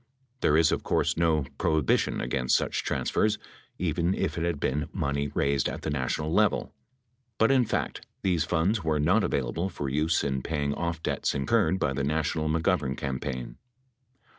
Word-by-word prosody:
There 75 - +3
is, 80 -1 +4
of - - 0
course, - - +1
no 80 -4 +2
prohibition 80 -4 +1
against 65 -2 +1
such - - -1
transfers, 105 - 0 0.4
even 85 +2 0
if - - -1
it 85 - -2
had 85 -4 -1
been 75 +3 -1
money 70 0 -1
raised 70 -1 +1
at - - -6
the 80 - -2
national 75 +3 -1
level. - - +2 0.6
But 115 +3 +4
in 130 -2 +4
fact, - - -2 0.2
these 90 -5 +2
funds 90 +5 +1
were 80 -2 +1
not 90 +9 +3
available 70 +8 -1
for 70 -7 -4
use 75 +4 +1
in 65 -1 -1
paying 70 -1 -1
off 85 +1 -3
debts - - -1
incurred 75 +5 +2
by 75 -7 0
the 70 +1 -2
national 75 +1 0
McGovern 80 -5 +1
campaign. 65 -2 -4
75 Hz, 165 wpm, -27 LUFS, 70-85 Hz, 0.6 s, is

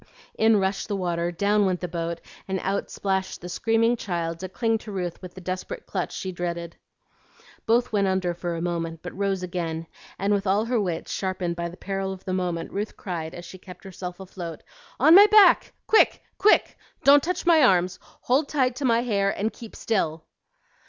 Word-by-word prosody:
In 220 0 +4
rushed 195 0 -1
the 205 - -2
water, 175 -2 -1
down 200 +3 +2
went 180 -1 0
the 180 - -4
boat, 170 0 -4 0.3
and 190 -1 -1
out 195 +1 -1
splashed 190 -1 -2
the 175 - -8
screaming 225 +5 +2
child 170 -6 -3
to 185 +1 -6
cling 225 +3 0
to 215 - -9
Ruth 180 -3 -4
with 180 -1 -10
the 185 - -9
desperate 185 - -5
clutch - - -3
she 190 - -4
dreaded. 170 -1 -4 0.9
Both 240 +2 +2
went 200 -2 +2
under 190 -2 0
for 175 0 -4
a 165 - -4
moment, 165 -2 -3
but 180 - -7
rose 195 -1 -1
again; 165 -2 -3 0.3
and 200 +2 +1
with 200 -1 0
all 200 +3 +2
her 235 -1 +1
wits 175 -4 -3
sharpened 185 -3 -2
by 170 0 -3
the 175 - -12
peril 195 -1 -3
of 185 - -12
the 185 - -2
moment, 175 -3 -2
Ruth 205 +2 -4
cried, 165 -3 -5
as 175 - -9
she 185 +2 -11
kept 180 +1 -13
herself 185 -1 -7
afloat, 180 -3 -8 0.4
"On 315 - +7
my 405 +3 +10
back, 425 -1 +6
quick! 440 - +4 0.2
quick! 420 - +3 0.2
Don't 285 +1 +7
touch 360 +5 -3
my 335 -2 +6
arms; 185 -7 +3
hold 280 +4 -1
tight 260 -4 +1
to 285 - -2
my 235 -1 +3
hair, 200 -5 +1
and 210 +3 -2
keep 230 -2 -11
still." 165 -7 -1
190 Hz, 200 wpm, -25 LUFS, 175-220 Hz, 0.9 s, my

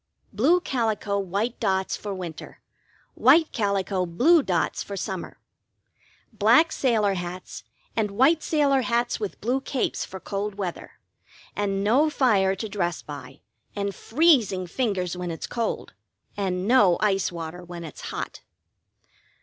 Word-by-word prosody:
Blue 280 - +4
calico, 220 - -1
white 200 +6 -2
dots 190 -4 0
for 205 - -6
winter, 180 -4 -7 0.5
white 315 +5 +5
calico, 195 -4 0
blue 295 - +4
dots 180 -10 -1
for 200 - -6
summer. 190 -1 -5 1.0
Black 235 +10 +5
sailor 220 -6 +2
hats 180 0 -6 0.3
and 220 -2 +1
white 270 +11 +3
sailor 285 -4 +2
hats 240 -1 0
with 210 -3 -5
blue 250 +5 0
capes 270 -1 -2
for 190 - -8
cold 200 +1 -4
weather, 190 -4 -5 0.6
and 195 -1 -1
no 260 +9 +4
fire 205 -10 +2
to 220 +3 -4
dress 175 -5 -2
by, 140 -2 -10 0.3
and 200 -1 -2
freezing 235 - +2
fingers 185 -3 -1
when 180 -1 -4
it's 165 - -5
cold, 230 -2 -3 0.4
and 190 -1 -2
no 210 -8 +5
ice 195 -3 +1
water 170 +1 -7
when 175 -1 -8
it's 160 - -9
hot. - - -5
200 Hz, 135 wpm, -25 LUFS, 185-245 Hz, 1.0 s, white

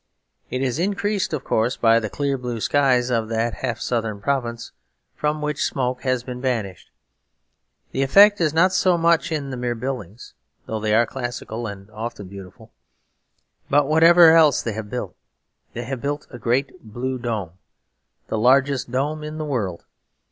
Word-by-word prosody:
It 130 +1 -2
is 130 +2 -1
increased, 200 +2 -1
of 150 -4 -3
course, 115 +3 0
by 115 0 +4
the 110 -2 -4
clear 140 +2 -1
blue 125 -3 -4
skies 130 -1 +2
of 115 -2 0
that 115 0 -1
half 120 -4 -4
southern 115 -4 -2
province, 120 0 -2 0.4
from 150 0 -2
which 150 -1 -1
smoke 125 -1 -1
has 130 -2 0
been 125 0 -7
banished. 115 -8 -3 1.0
The 135 - -1
effect 200 +8 +6
is 155 -2 +2
not 175 +4 +3
so 180 -1 +3
much 165 0 +2
in 145 -3 -3
the 130 - -5
mere 120 -1 -2
buildings, 120 -4 -6 0.3
though 110 - -4
they 105 0 +1
are 120 +1 +4
classical 120 -2 -5
and 100 -1 -9
often 110 -2 -6
beautiful. 95 -1 -12 1.0
But 145 0 +3
whatever 165 +2 +7
else 155 -4 +5
they 115 - -2
have 105 0 -6
built, 125 - -5 0.6
they 120 - -5
have 130 0 -5
built 145 +1 -3
a 120 - -9
great 135 +8 -1
blue 125 +4 -4
dome, 110 -8 -3 0.8
the 110 - -2
largest 130 +2 +3
dome 145 +5 -2
in 155 +1 -6
the 155 - -3
world. 105 - -3
125 Hz, 170 wpm, -22 LUFS, 115-145 Hz, 1.0 s, whatever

